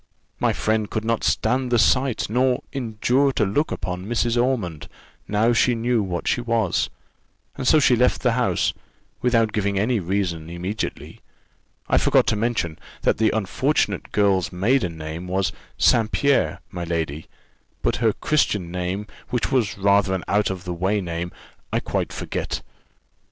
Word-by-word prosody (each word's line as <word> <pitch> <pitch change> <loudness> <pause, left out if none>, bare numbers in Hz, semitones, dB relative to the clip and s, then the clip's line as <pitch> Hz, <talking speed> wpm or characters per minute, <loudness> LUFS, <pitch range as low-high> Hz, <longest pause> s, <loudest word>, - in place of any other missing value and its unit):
My - - +2
friend 110 -1 0
could 110 0 -3
not 115 0 0
stand 125 +3 +1
the 120 - +4
sight, 130 +1 +2
nor 125 +3 +1
endure 130 +2 +1
to 105 - +2
look 145 +11 0
upon 90 +1 -4
Mrs. 120 0 0
Ormond 120 - -1 0.4
now 110 +3 +2
she 120 +1 +3
knew 115 0 +1
what 90 -3 -3
she 120 - +1
was; 115 -6 0 0.7
and 130 -2 -3
so 155 - +6
she 130 -3 +5
left 125 +2 +2
the 125 - +4
house, 115 -7 +1 0.5
without 115 -3 +2
giving 100 -1 0
any 110 +4 +1
reason, 90 -3 -2
immediately. 90 +5 -5 0.7
I - - +3
forgot - - +4
to - - +1
mention, 105 -8 -1 0.2
that - - +2
the 110 -1 +4
unfortunate 105 - 0
girl's 100 -3 +2
maiden 95 -2 +1
name 80 +3 -6
was 95 -1 0 0.3
St. 115 -2 +3
Pierre, 140 -1 +1
my 90 - -5
lady: 80 -3 -3 0.6
but - - +1
her 115 -2 +3
Christian 105 - 0
name, 90 +3 -3 0.2
which 125 - -1
was 115 -7 +1
rather 100 0 +3
an 90 - -4
out 105 +1 +2
o' 95 - -1
the 90 -1 -6
way 95 +4 0
name, 85 -1 -4 0.4
I - - +1
quite - - -2
forget." - - -4
105 Hz, 160 wpm, -23 LUFS, 90-120 Hz, 0.7 s, so